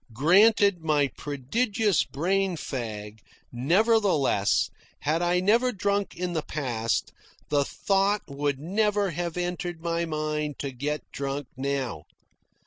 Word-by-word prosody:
Granted 200 - +5
my 150 -3 +2
prodigious 200 - 0
brain 190 +4 0
fag, 110 -6 -5 0.3
nevertheless, 165 - +2 0.3
had 155 +3 +1
I 175 +1 +2
never 230 +7 +3
drunk 200 -1 -1
in 180 0 -3
the 160 - 0
past, 120 -7 -2 0.4
the 145 -1 +3
thought 200 +6 +1
would 140 0 -1
never 205 +4 +1
have 170 +1 -3
entered 175 -1 -3
my 170 0 0
mind 150 -2 -2
to 140 - -4
get 145 +4 -3
drunk 140 -1 -4
now. 130 - -3
160 Hz, 120 wpm, -26 LUFS, 140-195 Hz, 0.4 s, Granted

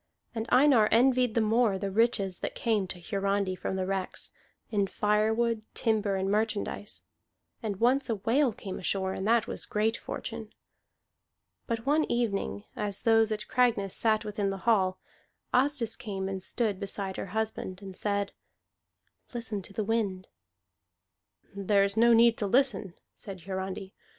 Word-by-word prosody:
And 225 -1 -3
Einar 255 -5 +6
envied 250 0 +3
the 230 - +3
more 220 -2 +3
the 195 +1 -3
riches 200 -4 +1
that - - -4
came 215 -5 0
to 180 0 -6
Hiarandi 195 +1 -1
from 190 - -3
the 190 -1 -1
wrecks, 190 -1 -3 0.4
in 200 -3 +1
firewood, 220 +3 +1
timber, 215 -3 +1
and 190 0 -1
merchandise. 210 0 -2 0.6
And 215 -4 -2
once 260 +3 +2
a 225 - +1
whale 240 +6 +2
came 195 -2 -7
ashore, 190 0 -1
and 190 - -3
that 230 -1 +4
was - - -5
great 220 +2 +1
fortune. 225 -2 -6 1.1
But 230 -1 -2
one 300 +3 +3
evening, 215 -4 -1
as 200 -2 -3
those 225 -1 +4
at 210 0 -3
Cragness 230 -6 +2
sat 220 -1 +2
within 205 -1 -1
the 195 -1 -6
hall, 190 -5 +3 0.6
Asdis 250 -3 +2
came 200 -7 -4
and 195 -1 -4
stood 210 -1 0
beside 195 -1 -4
her - - -4
husband, 215 -4 -2
and 190 -1 -8
said, 200 0 -1 1.0
"Listen 225 -4 -3
to 190 - -11
the 210 +2 -2
wind." 200 -4 -1 1.3
"There 200 0 +3
is 200 0 0
no 235 +1 +5
need 230 0 +5
to 205 - 0
listen," 235 -6 +1 0.2
said 195 -3 -8
Hiarandi. 190 +1 -5
210 Hz, 155 wpm, -29 LUFS, 195-230 Hz, 1.3 s, Einar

